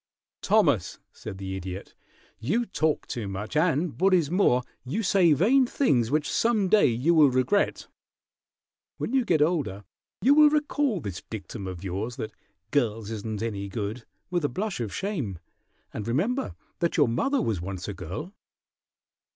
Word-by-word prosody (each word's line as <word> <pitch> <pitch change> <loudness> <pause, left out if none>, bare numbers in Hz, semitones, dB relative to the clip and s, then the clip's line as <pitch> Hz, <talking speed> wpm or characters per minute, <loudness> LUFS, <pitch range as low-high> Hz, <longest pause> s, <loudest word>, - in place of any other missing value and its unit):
"Thomas," - - +2
said 95 - -8
the 95 0 -5
Idiot, 95 0 -7 0.5
"you 195 - 0
talk 160 -7 0
too 115 -6 -4
much, 100 +7 -5
and, 160 +1 +1
what 190 0 +5
is 165 -4 +1
more, 150 -10 +3 0.2
you 185 - -2
say 185 -4 +4
vain 245 - +4
things 125 - +2
which 150 +2 +1
some 220 -5 +1
day 215 +1 +5
you 125 +8 +2
will 155 -4 +6
regret. 130 +11 +1 1.1
When - - -3
you 265 -1 +3
get 160 -9 +3
older 140 - -1 0.4
you 275 - +6
will 300 0 +7
recall 290 - 0
this 95 -7 -5
dictum 100 -1 -6
of 90 -1 -7
yours, 100 +6 -3
that 110 -4 -5 0.4
'girls 115 -6 0
isn't 110 0 -4
any 100 -3 -3
good,' 110 +3 -4 0.3
with 175 -2 0
a 145 - +1
blush 195 - -3
of 110 -4 -3
shame, 145 - -3 0.6
and 110 0 -5
remember 220 - -1 0.2
that 170 - 0
your 145 -4 +5
mother 265 - +1
was 105 -7 -1
once 95 0 -5
a 100 - -3
girl." 95 - -7
140 Hz, 160 wpm, -26 LUFS, -, 1.1 s, will